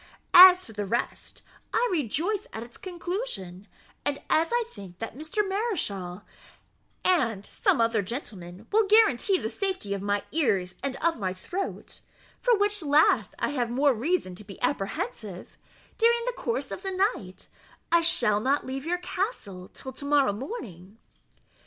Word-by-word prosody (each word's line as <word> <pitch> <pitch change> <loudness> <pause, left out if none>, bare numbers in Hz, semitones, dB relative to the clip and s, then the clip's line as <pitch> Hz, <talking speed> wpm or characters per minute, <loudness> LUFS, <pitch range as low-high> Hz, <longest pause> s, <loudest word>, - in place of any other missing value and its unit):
As 365 0 +10
to 225 - -10
the 205 -1 -4
rest, 235 +5 -3 0.3
I - - +2
rejoice 340 - -1
at 220 - -5
its 235 0 -12
conclusion; 345 - -5 0.4
and 285 -1 -1
as 320 +1 +4
I 480 0 +2
think 195 - -12
that 225 +2 -6
Mr. 315 +8 -2
Mareschal 210 - -2 0.8
and 230 - +2
some - - +1
other 230 -2 +2
gentlemen 195 -4 -7
will 430 0 +3
guarantee 405 - +4
the 220 - -3
safety 375 - -2
of 200 - -4
my 205 0 -1
ears 200 - +1
and 275 -1 -2
of 335 -5 +1
my 185 -2 -2
throat 360 - -6 0.4
(for 485 -3 +4
which 410 0 0
last 300 +1 +3
I - - -1
have 250 -5 -1
more 275 +3 +3
reason 250 - -1
to 185 - -8
be 200 -1 -12
apprehensive) 220 - -3 0.4
during 470 +1 +4
the - - -1
course 470 0 -3
of - - -5
the 385 0 +2
night, - - -12 0.4
I 340 0 +5
shall 240 -11 +4
not 270 +6 +1
leave 265 +3 -5
your 355 +1 +1
castle 355 - -4
till 265 - -9
to 275 - -9
morrow 285 -6 +3
morning." 210 - -8
275 Hz, 160 wpm, -27 LUFS, -, 0.8 s, As